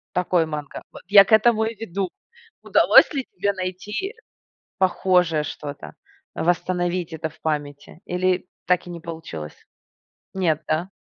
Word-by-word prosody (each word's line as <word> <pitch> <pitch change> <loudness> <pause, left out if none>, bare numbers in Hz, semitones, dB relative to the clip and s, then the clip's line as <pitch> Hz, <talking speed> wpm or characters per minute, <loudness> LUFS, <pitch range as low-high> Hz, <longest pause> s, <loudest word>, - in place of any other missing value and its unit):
Такой 180 -2 +2
манго? 150 -2 -6
Вот - - -12
я 200 0 +9
к - - -10
этому 220 +1 +5
и 225 +1 -4
веду. 195 -3 -4 0.5
Удалось - - +6
ли 270 -3 -2
тебе 200 0 -1
найти 200 - -4 0.6
похожее 180 -4 +2
что-то, 145 -1 -7 0.4
восстановить 175 0 -1
это 160 0 -4
в - - -23
памяти 145 0 -4
или 180 0 0 0.2
так 180 0 +2
и - - -8
не 170 -1 -7
получилось? 160 - -8 0.8
Нет, 170 -6 0
да? 160 +4 -1
180 Hz, 135 wpm, -23 LUFS, 160-190 Hz, 0.8 s, я